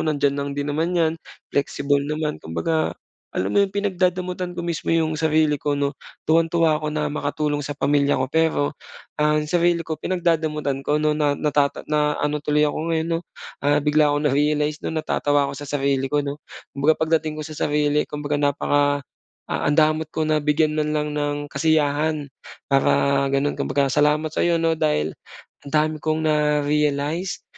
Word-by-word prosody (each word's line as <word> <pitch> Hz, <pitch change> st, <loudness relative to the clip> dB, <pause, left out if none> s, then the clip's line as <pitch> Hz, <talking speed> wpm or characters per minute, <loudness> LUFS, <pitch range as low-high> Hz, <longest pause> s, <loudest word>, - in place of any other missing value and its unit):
nandiyan 145 Hz, -3 st, +1 dB
lang 140 Hz, 0 st, -3 dB
din 145 Hz, 0 st, -2 dB
naman 165 Hz, +4 st, 0 dB
'yan, 160 Hz, -2 st, +2 dB, 0.4 s
flexible 140 Hz, 0 st, +1 dB
naman 150 Hz, +1 st, -3 dB
kumbaga 85 Hz, -, -1 dB, 0.4 s
alam 95 Hz, +2 st, -1 dB
mo -, -, +4 dB
'yong 200 Hz, -, +3 dB
pinagdadamutan 180 Hz, -2 st, -1 dB
ko 175 Hz, -, -4 dB
mismo 170 Hz, -2 st, -3 dB
'yong 160 Hz, -1 st, +2 dB
sarili 155 Hz, -2 st, +2 dB
ko 145 Hz, -1 st, 0 dB
'no, 140 Hz, 0 st, 0 dB, 0.3 s
tuwang-tuwa 165 Hz, -1 st, +2 dB
ako 155 Hz, -, -3 dB
na 150 Hz, -1 st, -2 dB
makatulong 145 Hz, 0 st, -1 dB
sa 145 Hz, 0 st, -5 dB
pamilya 145 Hz, 0 st, +2 dB
ko 130 Hz, +1 st, -2 dB
pero 160 Hz, -3 st, +1 dB, 0.5 s
ang 150 Hz, 0 st, +2 dB
sarili 170 Hz, +1 st, +1 dB
ko 160 Hz, -1 st, -5 dB
pinagdadamutan 160 Hz, -6 st, 0 dB
ko 145 Hz, +2 st, 0 dB
'no 150 Hz, 0 st, +2 dB
na 145 Hz, -2 st, +1 dB
nata 145 Hz, -2 st, +2 dB, 0.2 s
na 150 Hz, -1 st, +1 dB
ano 150 Hz, 0 st, -1 dB
tuloy 150 Hz, +1 st, +2 dB
ako 150 Hz, -, -1 dB, 0.2 s
ngayon, 160 Hz, +1 st, -1 dB
'no, 165 Hz, -, +1 dB, 0.4 s
ah, 145 Hz, +1 st, +2 dB
bigla 150 Hz, 0 st, +4 dB
ko 145 Hz, -, -2 dB
na-realize 150 Hz, +1 st, +1 dB
'no 160 Hz, -, -4 dB
natatawa 145 Hz, -2 st, +1 dB
ako 140 Hz, -, -8 dB
sa 145 Hz, -, -8 dB
sarili 135 Hz, -1 st, 0 dB
ko 145 Hz, +1 st, 0 dB
'no, 145 Hz, +1 st, -5 dB, 0.3 s
kumbaga 145 Hz, +3 st, +2 dB
pagdating 160 Hz, -1 st, 0 dB
ko 155 Hz, -, -5 dB
sa 155 Hz, -, -8 dB
sarili 150 Hz, 0 st, 0 dB
kumbaga 145 Hz, 0 st, -2 dB
napaka 145 Hz, 0 st, +1 dB, 0.5 s
ah, -, -, -1 dB
ang 145 Hz, -, +1 dB
damot 155 Hz, 0 st, +3 dB
ko 155 Hz, 0 st, -2 dB
na 155 Hz, 0 st, +1 dB
bigyan 150 Hz, +1 st, +2 dB
man 150 Hz, 0 st, 0 dB
lang 150 Hz, 0 st, -2 dB
ng 145 Hz, 0 st, -2 dB
kasiyahan 150 Hz, 0 st, +1 dB, 0.5 s
para 140 Hz, 0 st, +3 dB
gano'n 140 Hz, +1 st, +1 dB
kumbaga 140 Hz, -2 st, 0 dB
salamat 150 Hz, +2 st, +2 dB
sa -, -, -1 dB
'yo 170 Hz, -1 st, +3 dB
'no 165 Hz, 0 st, +1 dB
dahil, 75 Hz, +1 st, +1 dB, 0.5 s
ang 140 Hz, -, -10 dB
dami 155 Hz, +1 st, +2 dB
kong 155 Hz, 0 st, 0 dB
na-realize 150 Hz, +3 st, 0 dB
150 Hz, 175 wpm, -22 LUFS, 145-155 Hz, 0.5 s, mo